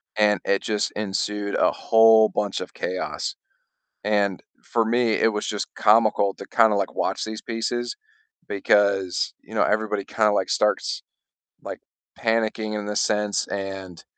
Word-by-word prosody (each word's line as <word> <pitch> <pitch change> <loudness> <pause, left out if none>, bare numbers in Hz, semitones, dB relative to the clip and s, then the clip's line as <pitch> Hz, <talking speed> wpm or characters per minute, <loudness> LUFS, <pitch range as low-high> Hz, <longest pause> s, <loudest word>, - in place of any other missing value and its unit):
and 105 -2 +3
it 100 - +1
just 105 -1 -1
ensued 105 0 -2
a - - +3
whole 110 -1 +5
bunch 105 -1 -2
of - - -7
chaos. 90 0 -3 0.7
And 100 -2 0 0.2
for 115 - 0
me, 120 +1 +1
it 110 - +2
was 105 0 -3
just 105 - -3
comical 105 -2 +3
to - - -10
kind 110 -2 +4
of 100 - +1
like 100 - -3
watch - - -1
these 110 0 -6
pieces 120 +1 -3 0.5
because, 100 -2 +1
you - - -14
know, - - +1
everybody 105 -1 0
kind 110 +2 +1
of 105 - +2
like 95 -2 0
starts, - - 0 0.6
like, - - -7 0.4
panicking 110 -1 -1
in 105 0 -5
a 105 - -3
sense, 105 -1 0
and, 95 -3 -6
105 Hz, 155 wpm, -23 LUFS, 100-110 Hz, 0.7 s, whole